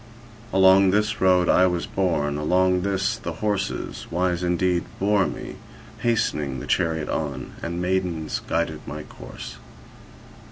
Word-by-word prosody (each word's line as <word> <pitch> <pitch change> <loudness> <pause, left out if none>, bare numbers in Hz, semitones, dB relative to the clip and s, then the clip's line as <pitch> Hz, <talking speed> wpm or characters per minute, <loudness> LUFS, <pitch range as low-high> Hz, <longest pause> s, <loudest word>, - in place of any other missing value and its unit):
Along 95 0 +6
this 105 +2 +1
road 90 -2 +4
I 95 - +5
was 90 -1 -1
borne, 80 -7 0
along 90 +4 +2
this 95 0 0
the 85 - -5
horses, 100 +3 -3
wise 90 0 0
indeed, 90 0 +1 0.2
bore 100 0 +3
me - - -7 0.4
hastening 75 - 0
the - - -7
chariot 80 -3 0
on, 70 -4 -3
and 85 +1 -3
maidens 90 -3 -1
guided - - -1
my 75 +2 -6
course. - - -10
90 Hz, 130 wpm, -24 LUFS, 80-95 Hz, 0.4 s, Along